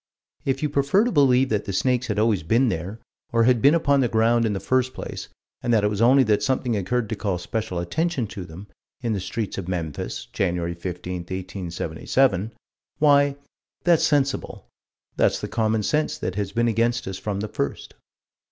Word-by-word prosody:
If 135 Hz, +1 st, -1 dB
you 150 Hz, -, +1 dB
prefer 140 Hz, +8 st, +2 dB
to 245 Hz, -, 0 dB
believe 135 Hz, -3 st, +4 dB
that 105 Hz, -1 st, -1 dB
the -, -, -3 dB
snakes 125 Hz, +4 st, +1 dB
had 105 Hz, -, -2 dB
always 105 Hz, -4 st, +2 dB
been 115 Hz, -, +2 dB
there, 95 Hz, +5 st, -4 dB, 0.3 s
or 115 Hz, 0 st, +3 dB
had 120 Hz, -1 st, +3 dB
been 145 Hz, +7 st, +6 dB
upon 140 Hz, -4 st, +3 dB
the 130 Hz, -, +3 dB
ground 115 Hz, +1 st, +2 dB
in 110 Hz, -, 0 dB
the 95 Hz, -, -2 dB
first 130 Hz, +2 st, 0 dB
place, -, -, -7 dB, 0.3 s
and 120 Hz, -, -1 dB
that 110 Hz, -3 st, +3 dB
it 105 Hz, -, +2 dB
was 105 Hz, +1 st, -2 dB
only 130 Hz, +3 st, +6 dB
that 105 Hz, -3 st, +2 dB
something 130 Hz, -3 st, 0 dB
occurred 110 Hz, +4 st, -1 dB
to 110 Hz, -, -2 dB
call 100 Hz, -3 st, -2 dB
special 95 Hz, 0 st, -4 dB
attention 140 Hz, -, -1 dB
to 100 Hz, -, -6 dB
them, 85 Hz, +4 st, -10 dB, 0.4 s
in 115 Hz, -3 st, -1 dB
the 100 Hz, -, -1 dB
streets 105 Hz, +2 st, -4 dB
of 90 Hz, -, -6 dB
Memphis, 85 Hz, -5 st, -4 dB
Jan. 90 Hz, -3 st, 0 dB, 0.2 s
15, 90 Hz, +1 st, -5 dB
1877 95 Hz, +4 st, -1 dB, 0.5 s
why, 145 Hz, -1 st, +4 dB, 0.5 s
that's 170 Hz, -3 st, +4 dB
sensible: 140 Hz, -3 st, 0 dB, 0.5 s
that's -, -, +2 dB
the -, -, -4 dB
common 110 Hz, -1 st, 0 dB
sense 150 Hz, +7 st, 0 dB
that 90 Hz, -, -3 dB
has 100 Hz, 0 st, -3 dB
been 120 Hz, 0 st, +1 dB
against 115 Hz, +1 st, 0 dB
us 95 Hz, -, -5 dB
from 100 Hz, -2 st, -3 dB
the 105 Hz, -, -3 dB
first. -, -, -4 dB
115 Hz, 190 wpm, -24 LUFS, 95-130 Hz, 0.5 s, been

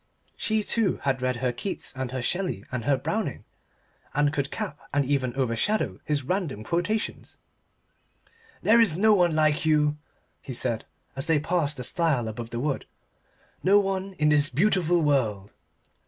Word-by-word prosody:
She, 220 Hz, -1 st, 0 dB
too, 215 Hz, -3 st, +1 dB
had 135 Hz, -2 st, 0 dB
read 130 Hz, 0 st, 0 dB
her 125 Hz, 0 st, -1 dB
Keats 190 Hz, +2 st, -5 dB
and 130 Hz, -1 st, -3 dB
her 130 Hz, 0 st, -4 dB
Shelley 175 Hz, -, -2 dB
and 125 Hz, -3 st, -3 dB
her 140 Hz, -1 st, +3 dB
Browning -, -, -3 dB, 0.7 s
and 145 Hz, 0 st, +2 dB
could 140 Hz, -2 st, -1 dB
cap 145 Hz, -, -4 dB
and 145 Hz, 0 st, +1 dB
even 130 Hz, -2 st, 0 dB
overshadow 125 Hz, -, 0 dB
his 145 Hz, -2 st, -1 dB
random 160 Hz, -, -2 dB
quotations. 180 Hz, -, -2 dB, 1.3 s
"There 230 Hz, +2 st, +6 dB
is 180 Hz, -8 st, +3 dB
no 215 Hz, +3 st, +5 dB
one 175 Hz, -5 st, +3 dB
like 155 Hz, +1 st, +2 dB
you," 150 Hz, -1 st, +2 dB, 0.4 s
he 130 Hz, -, -7 dB
said 120 Hz, -2 st, -1 dB, 0.3 s
as 135 Hz, -, -1 dB
they 160 Hz, -2 st, +3 dB
passed 155 Hz, -2 st, 0 dB
the 125 Hz, -, -4 dB
stile 145 Hz, -5 st, +1 dB
above 115 Hz, +1 st, -6 dB
the 120 Hz, -, -4 dB
wood; 140 Hz, +1 st, -2 dB, 0.7 s
"no 200 Hz, +3 st, +5 dB
one 195 Hz, -1 st, -2 dB
in 150 Hz, -4 st, +2 dB
this 145 Hz, -1 st, +4 dB
beautiful 175 Hz, +2 st, +2 dB
world." 110 Hz, -9 st, 0 dB
145 Hz, 160 wpm, -26 LUFS, 130-180 Hz, 1.3 s, There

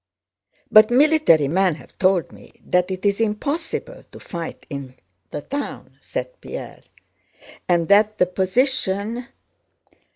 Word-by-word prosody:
"But 215 Hz, 0 st, +8 dB
military 275 Hz, -, +4 dB
men 180 Hz, +2 st, +2 dB
have -, -, -16 dB
told 185 Hz, -2 st, +2 dB
me -, -, -16 dB
that 180 Hz, 0 st, +1 dB
it 185 Hz, +1 st, -5 dB
is 200 Hz, +2 st, +2 dB
impossible 290 Hz, -, -3 dB
to -, -, -12 dB
fight 170 Hz, -2 st, -7 dB
in 140 Hz, -3 st, -7 dB, 0.3 s
the 145 Hz, -, -6 dB
town," 285 Hz, +1 st, -6 dB
said -, -, -6 dB
Pierre, -, -, -8 dB, 0.9 s
"and 170 Hz, -2 st, +2 dB
that 210 Hz, +1 st, +4 dB
the 180 Hz, -, +4 dB
position..." 210 Hz, +3 st, -1 dB
200 Hz, 125 wpm, -22 LUFS, 180-255 Hz, 0.9 s, But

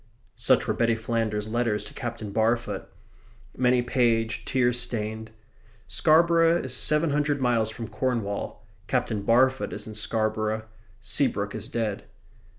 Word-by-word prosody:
Such -, -, +2 dB
were -, -, +1 dB
Betty 115 Hz, -1 st, +2 dB
Flanders's 110 Hz, -2 st, -2 dB
letters 115 Hz, -4 st, 0 dB
to -, -, -10 dB
Captain 115 Hz, -4 st, -5 dB
Barfoot 110 Hz, -2 st, 0 dB, 0.7 s
many 125 Hz, -1 st, +3 dB
paged, 115 Hz, -3 st, +1 dB
tear 125 Hz, -2 st, +2 dB
stained. 110 Hz, -2 st, -3 dB, 0.6 s
Scarborough 165 Hz, +1 st, +4 dB
is 130 Hz, -, -5 dB
seven 150 Hz, +3 st, +1 dB
hundred 145 Hz, 0 st, +1 dB
miles 120 Hz, -4 st, +2 dB
from 115 Hz, 0 st, -6 dB
Cornwall: 110 Hz, -3 st, -3 dB, 0.2 s
Captain 120 Hz, -5 st, 0 dB
Barfoot 130 Hz, +5 st, +3 dB
is 105 Hz, -, -4 dB
in 110 Hz, -, -8 dB
Scarborough: 110 Hz, 0 st, -1 dB, 0.4 s
Seabrook 105 Hz, -7 st, 0 dB
is 110 Hz, -1 st, -5 dB
dead. 110 Hz, -4 st, -3 dB
115 Hz, 130 wpm, -26 LUFS, 110-125 Hz, 0.7 s, Scarborough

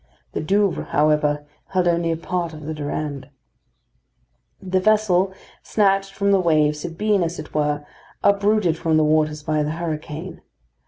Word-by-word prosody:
The -, -, -3 dB
Douvres, 195 Hz, +4 st, +1 dB
however, 150 Hz, 0 st, +2 dB, 0.2 s
held 185 Hz, -2 st, +1 dB
only 170 Hz, -1 st, +1 dB
a 165 Hz, -, -1 dB
part 170 Hz, 0 st, -3 dB
of 155 Hz, -, -10 dB
the 155 Hz, -, -3 dB
Durande. 145 Hz, -2 st, -4 dB, 1.3 s
The 185 Hz, 0 st, 0 dB
vessel 195 Hz, -2 st, +3 dB, 0.3 s
snatched 195 Hz, -2 st, +1 dB
from 200 Hz, 0 st, +1 dB
the 195 Hz, -, +4 dB
waves 155 Hz, -4 st, +2 dB
had 165 Hz, 0 st, -6 dB
been, 210 Hz, -1 st, +2 dB
as 170 Hz, 0 st, -2 dB
it 155 Hz, -, -9 dB
were, 150 Hz, -1 st, 0 dB, 0.4 s
uprooted 200 Hz, -4 st, +3 dB
from 160 Hz, -1 st, +2 dB
the 155 Hz, -, +4 dB
waters 155 Hz, 0 st, +1 dB
by 155 Hz, 0 st, 0 dB
the 150 Hz, +1 st, -1 dB
hurricane. 160 Hz, +1 st, -5 dB
165 Hz, 155 wpm, -22 LUFS, 150-190 Hz, 1.3 s, the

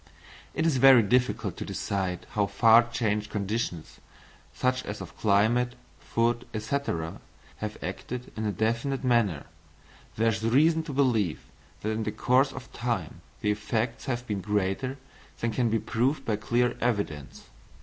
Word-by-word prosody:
It 160 Hz, -, 0 dB
is 160 Hz, -5 st, +2 dB
very 130 Hz, -2 st, +8 dB
difficult 125 Hz, +5 st, +1 dB
to -, -, -4 dB
decide 95 Hz, -3 st, -3 dB
how 105 Hz, -1 st, +1 dB
far 115 Hz, +3 st, +5 dB
changed 105 Hz, -3 st, -1 dB
conditions, 100 Hz, -5 st, -3 dB, 0.5 s
such 130 Hz, 0 st, 0 dB
as 105 Hz, -, -5 dB
of -, -, -9 dB
climate, 110 Hz, +4 st, +2 dB, 0.3 s
food, 120 Hz, +1 st, 0 dB
&c., 110 Hz, +6 st, -2 dB, 0.8 s
have 105 Hz, 0 st, -5 dB
acted 125 Hz, 0 st, -5 dB
in 110 Hz, -1 st, -2 dB
a -, -, +1 dB
definite 115 Hz, +7 st, -1 dB
manner. 115 Hz, -, +2 dB, 0.7 s
There 115 Hz, +1 st, +3 dB
is 110 Hz, -1 st, -1 dB
reason 155 Hz, +8 st, +4 dB
to 155 Hz, -, -5 dB
believe 120 Hz, -, +1 dB, 0.4 s
that 110 Hz, -, -1 dB
in 110 Hz, +1 st, -2 dB
the 105 Hz, -, -2 dB
course 130 Hz, +5 st, +3 dB
of 135 Hz, -1 st, -10 dB
time 115 Hz, -9 st, -3 dB, 0.2 s
the 105 Hz, -, +2 dB
effects 110 Hz, +3 st, -2 dB
have 120 Hz, -2 st, -2 dB
been 105 Hz, -4 st, -3 dB
greater 105 Hz, +7 st, -1 dB, 0.4 s
than 115 Hz, -, 0 dB
can 120 Hz, 0 st, +1 dB
be 115 Hz, -, +2 dB
proved 130 Hz, +6 st, 0 dB
by 110 Hz, -2 st, 0 dB
clear 120 Hz, +3 st, +1 dB
evidence. 100 Hz, -, -2 dB
115 Hz, 150 wpm, -28 LUFS, 105-125 Hz, 0.8 s, very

